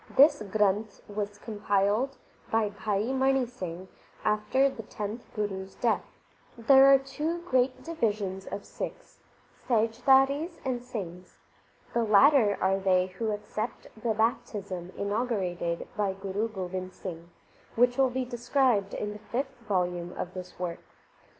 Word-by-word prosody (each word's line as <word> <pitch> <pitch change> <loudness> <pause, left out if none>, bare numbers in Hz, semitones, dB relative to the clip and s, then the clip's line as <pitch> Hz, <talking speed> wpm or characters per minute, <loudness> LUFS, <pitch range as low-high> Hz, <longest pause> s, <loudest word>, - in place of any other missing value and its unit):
This 285 -1 +7
Granth 210 0 0
was 205 0 -4
compiled 205 +4 0 0.3
by 225 -2 +2
Bhai 205 +3 -1
Mani 265 0 +3
Singh 185 -7 -7 0.4
after 215 +6 +3
the 265 -4 -5
tenth 210 +2 -6
Guru 200 -3 -2
s 190 - -17
death. 235 -2 +1 0.5
There 270 +3 +7
are 275 - +9
two 300 +6 -3
great 255 -5 +1
divisions 210 - -2
of 200 - -5
Sikhs, - - -7 0.5
Sahijdharis 270 +8 +3
and 250 -2 -1
Singhs. 185 -8 -7 0.6
The 235 - +2
latter 220 0 +5
are 195 +1 +2
they 185 -1 +2
who 225 -1 0
accept 215 +2 -4
the 220 0 -1
baptism 205 -5 -1
in 200 - -2
augurated 185 -7 -1
by 205 -2 0
Guru 195 +3 -2
Gobind 185 -2 -5
Singh, 170 -2 -7 0.5
which 245 +2 +3
will 265 -1 +5
be 255 +1 -2
described 240 -4 +1
in 210 0 -3
the 210 - -9
fifth 260 +5 -3
volume 180 -2 0
of 180 - -5
this 180 -1 -8
work. 175 -2 -4
215 Hz, 135 wpm, -29 LUFS, 195-250 Hz, 0.6 s, are